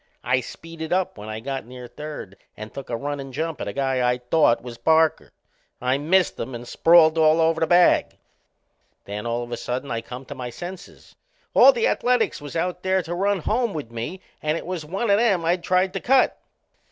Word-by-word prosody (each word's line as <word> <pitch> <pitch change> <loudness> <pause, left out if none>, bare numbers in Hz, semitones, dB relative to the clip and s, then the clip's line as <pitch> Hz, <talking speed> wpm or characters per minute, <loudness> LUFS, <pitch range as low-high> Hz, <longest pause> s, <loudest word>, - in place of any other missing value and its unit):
I 125 - +2
speeded 160 +4 -8
up 185 0 0
when 105 +1 -8
I 110 0 -5
got 135 -1 -5
near 125 0 -9
third 150 -10 -8 0.2
and 110 +1 -9
took 140 - -8
a 115 - -2
runnin' 140 +1 -5
jump 160 +4 -3
at - - -4
a - - -2
guy 135 -2 -1
I 125 - +1
thought 125 0 +2
was 120 -2 -9
Parker. 160 0 +2 0.5
I 130 +2 0
missed 180 +5 +2
him 125 +2 -5
and 120 +1 -8
sprawled 165 +1 +5
all 155 +1 +5
over 160 0 +2
the 160 - +2
bag. 175 +1 +4 0.9
Then, 105 +3 -5
all 120 +1 -1
of 120 - -10
a 120 - -3
sudden, 125 +2 -4
I 115 -1 -2
come 125 +3 -9
to 145 - -7
my 125 -3 -6
senses. 175 +9 -10 0.4
All - - +8
the 475 -2 0
Ath - - +1
a - - -2
letics 245 -9 +2
was 145 +1 -9
out 180 +2 -2
there 190 0 +1
to 165 - -5
run 195 +1 0
home 230 +2 0
with 140 -7 -6
me 120 +11 -5 0.2
and 155 +1 0
it - - -7
was 180 -3 -4
one 195 +8 -1
o' 200 - +5
them 200 -7 +2
I'd 175 +1 +1
tried 185 +1 +1
to 195 - -2
cut. 260 +3 +3
155 Hz, 220 wpm, -23 LUFS, 125-180 Hz, 0.9 s, All